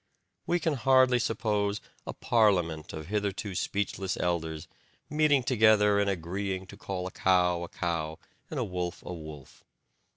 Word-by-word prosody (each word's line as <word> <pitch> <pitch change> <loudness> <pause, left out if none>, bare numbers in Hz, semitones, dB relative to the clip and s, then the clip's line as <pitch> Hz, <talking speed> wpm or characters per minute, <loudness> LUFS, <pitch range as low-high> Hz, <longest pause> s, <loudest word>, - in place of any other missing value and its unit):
We 175 - +2
can 160 -1 0
hardly 130 -1 +4
suppose 105 -3 0 0.3
a - - -3
parliament 90 -9 +1
of 80 -1 -7
hitherto 100 +1 -2
speechless 95 0 -2
elders 80 -3 -2 0.4
meeting 150 -3 +3
together 110 -4 +4
and 100 0 +2
agreeing 95 +1 -3
to - - -9
call 95 -2 -5
a 95 - -5
cow 90 -2 +2
a 85 - -4
cow 80 -2 -3 0.3
and - - -3
a - - +1
wolf 90 -2 -4
a - - -5
wolf. 75 -5 -10
95 Hz, 150 wpm, -29 LUFS, 85-110 Hz, 0.4 s, hardly